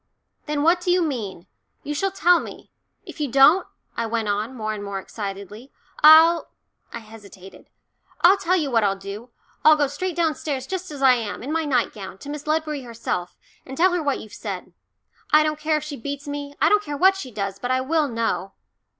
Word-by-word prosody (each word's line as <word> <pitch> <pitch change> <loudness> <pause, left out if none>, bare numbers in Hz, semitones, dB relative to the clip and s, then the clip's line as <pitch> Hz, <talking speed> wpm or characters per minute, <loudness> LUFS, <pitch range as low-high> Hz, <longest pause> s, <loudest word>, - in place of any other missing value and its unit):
"Then 295 -1 -1
what 345 +3 +3
do 355 - -3
you 355 0 +3
mean? 215 - -4 0.4
You 295 - -4
shall 390 +7 0
tell 355 -2 +3
me - - -10 0.3
if - - -11
you 295 -2 -1
don't," 275 +8 +5 0.3
I 230 - -2
went 225 -1 -2
on, 210 +5 -2
more 215 -2 -3
and 205 -1 -6
more 200 -1 -4
excitedly, 200 +4 -7 0.3
"I'll 320 +2 +7 0.2
" - - -45
I - - -6
hesitated 205 -4 -14 0.5
"I'll 380 +3 +6
tell 365 -1 +1
you 300 -7 -1
what 230 -2 +3
I'll 195 -1 +2
do, 200 +5 -9 0.3
I'll 310 0 +7
go 295 -1 +2
straight 335 +6 -4
downstairs, 310 -5 -1
just 370 -1 -5
as 285 -2 -6
I 260 -1 +7
am, 225 -3 -4
in 275 - -5
my 325 0 0
nightgown, 220 -8 -2
to 280 - -11
Miss 295 0 -7
Ledbury 305 -2 -1
herself, 230 -7 -5 0.3
and 265 0 -9
tell 365 +2 +4
her 355 - 0
what 285 -3 -1
you've 215 - -12
said. - - -7 0.6
I 305 0 +6
don't 305 0 -2
care 310 0 +1
if 300 - -5
she 300 -2 -7
beats 285 +4 -6
me, 285 0 -6
I - - +4
don't 420 0 +4
care 290 -7 -5
what 380 +5 +5
she 330 -9 -7
does, 200 -3 -4
but 245 - -4
I 255 0 +1
will 305 +3 +1
know." 230 -5 -2
280 Hz, 210 wpm, -23 LUFS, 220-315 Hz, 0.6 s, I'll